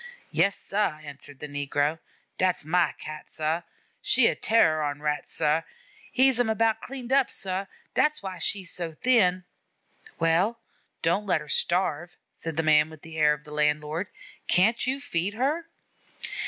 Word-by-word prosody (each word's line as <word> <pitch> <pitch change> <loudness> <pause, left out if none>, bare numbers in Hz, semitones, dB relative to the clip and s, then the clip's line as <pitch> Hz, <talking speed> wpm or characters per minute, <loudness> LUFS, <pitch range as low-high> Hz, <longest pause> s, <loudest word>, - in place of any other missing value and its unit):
"Yes, 200 0 +3
sah," 195 -6 -1
answered 145 -1 -9
the 150 - -5
negro. 145 +2 -1 0.4
"Dat's 185 -5 +1
ma 170 +2 +2
Cat, 155 0 -9
sah; 160 +2 -1 0.4
she's 255 -3 +4
a - - -2
terror 160 -9 +3
on 145 -1 -2
Rats, 150 0 -2
sah! 150 +2 +2 0.5
hez 260 -1 +4
'em 245 -2 +2
about 225 0 +1
cleaned 260 -1 -5
up, 275 -2 +4
sah; 190 +1 -1 0.3
dat's 300 -5 +1
why 190 -2 -6
she's 185 +1 -1
so 170 -2 -2
thin." 185 -4 +3 0.7
"Well, 180 +8 +2 0.4
don't 185 +5 +1
let 170 -5 +2
her 150 - -10
starve," 175 +1 +1 0.2
said 160 -1 -6
the 160 - +2
man 155 0 +4
with 155 -2 -14
the 160 -1 -9
air 150 -1 +5
of 150 0 -8
the 150 -1 -11
landlord. 150 +4 0 0.4
"Can't 220 +7 +3
you 265 +2 0
feed 200 -7 -2
her? 295 +8 -1
175 Hz, 160 wpm, -26 LUFS, 150-220 Hz, 0.7 s, air